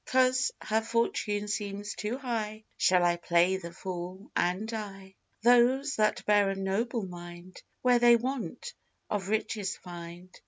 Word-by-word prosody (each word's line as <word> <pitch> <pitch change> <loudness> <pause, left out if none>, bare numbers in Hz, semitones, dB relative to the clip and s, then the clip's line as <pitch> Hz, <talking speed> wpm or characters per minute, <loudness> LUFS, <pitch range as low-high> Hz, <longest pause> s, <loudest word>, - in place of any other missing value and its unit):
'Cause 255 0 +3
her 220 +1 +1
fortune 220 -2 -1
seems 205 0 -3
too 215 +4 -3
high, 220 -5 -3
Shall 180 -1 +3
I 175 0 +2
play 175 +2 +3
the 170 -2 -8
fool 185 +2 -7
and 185 +5 0
die? 195 -4 -6 0.3
Those 250 +4 +4
that 215 -1 +1
bear 205 -1 +4
a 195 - -1
noble 200 +4 -1
mind, 175 0 -10 0.2
Where 250 -1 +5
they 240 0 +7
want, 265 - -3 0.4
of 200 -2 -2
riches 210 -2 -1
find. 175 +1 -10
210 Hz, 145 wpm, -29 LUFS, 185-235 Hz, 0.4 s, they